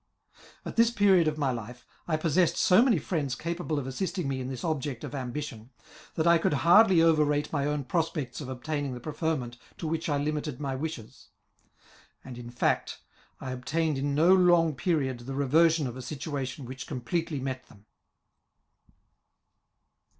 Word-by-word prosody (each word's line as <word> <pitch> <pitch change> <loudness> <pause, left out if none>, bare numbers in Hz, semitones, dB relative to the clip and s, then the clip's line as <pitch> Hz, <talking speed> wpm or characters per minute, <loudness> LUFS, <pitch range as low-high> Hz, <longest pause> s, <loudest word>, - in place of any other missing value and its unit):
At - - -7
this 230 0 +6
period 195 -7 +4
of 155 0 -1
my 140 -3 +1
life, 120 +1 -7 0.2
I 155 -2 +1
possessed 165 +2 +2
so 185 +4 +5
many 245 -6 +4
friends 145 -5 -2
capable 170 -1 -3
of 140 - -2
assisting 175 +5 -3
me 135 -1 -2
in 125 - -4
this 130 -3 -6
object 145 -6 -2
of - - -6
ambition, 130 -3 -5 0.5
that 160 - 0
I 170 0 +5
could 160 - +1
hsirdly 185 -1 +7
over 160 -2 +5
rate 145 +1 -1
my 140 -1 0
own 150 -1 -1
prospects 150 -1 -2
of 135 - -7
obtaining 140 +1 -3
the - - -7
preferment 145 -4 -3 0.2
to - - -6
which 160 +1 -2
I 145 - +1
limited 150 -2 -3
my 140 -2 -3
wishes; 130 -6 -7 1.0
and, 130 - -8
in 120 0 -8
fact, 120 - -1 0.4
I 130 - -5
obtained 145 +3 -1
in 140 +1 -1
no 165 +5 +5
long 175 -4 +4
period 135 -4 -1
the 130 +3 -7
reversion 155 +3 +3
of 125 -2 -5
a 130 - -7
situatioa 135 0 -5
which 130 +2 -8
com 125 - -5
pletely 160 +3 -2
met 130 -1 -5
them. 100 -1 -19
145 Hz, 170 wpm, -28 LUFS, 130-165 Hz, 1.0 s, hsirdly